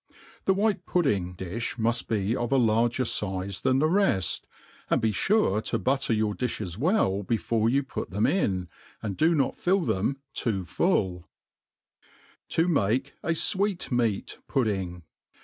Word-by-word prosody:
Thp 190 - +4
white 200 -2 +1
pudding 100 - +1
difli 95 +6 -4
muft 115 +1 0
be 105 +1 0
of 120 -1 -2
a 135 - +4
larger 120 +1 +2
fize 95 -4 -1
than 130 0 +2
the 150 +3 +3
reft; 160 - +1 0.4
and - - +3
be 110 - +1
fure 105 - +2
to - - 0
butter 135 0 0
your 110 -1 +1
difiies 105 -7 -3
well 130 - +1
before 110 +2 0
you 140 +3 +2
put 135 - -5
them 100 +3 -1
in^ 95 - +1 0.4
and 100 -3 -3
do 165 - +3
not 140 -3 +1
fill 190 +2 +2
them 135 - 0 0.2
too 100 -5 -1
fulU 90 +1 0 1.2
To 165 +2 +2
make. 135 - +1
a 165 - 0
Swat' 195 -1 0
Meat 115 -5 -1
Pudding. 95 - -1
115 Hz, 150 wpm, -27 LUFS, 100-145 Hz, 1.2 s, Thp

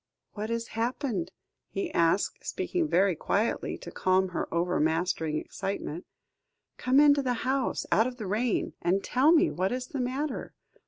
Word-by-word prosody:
"What 215 +1 -4
has 230 0 -2
happened?" 225 - -2 0.4
he 195 - -3
asked, 170 +4 +1
speaking 345 -3 -1
very 190 - +3
quietly, 210 +8 -1
to - - -9
calm 185 0 +2
her 180 - -3
overmastering 165 -2 0
excitement; 180 -2 -4 0.7
"come 260 +2 +3
into 290 -1 +6
the 250 -2 0
house 265 0 0
out 220 +3 +4
of 250 -1 -6
the 220 - -5
rain, 215 +5 0
and 185 +3 +1
tell 270 +5 +3
me 335 0 +5
what 185 +2 -1
is 250 0 -2
the 275 - -5
matter. 265 +5 -3
220 Hz, 155 wpm, -28 LUFS, 185-255 Hz, 0.7 s, into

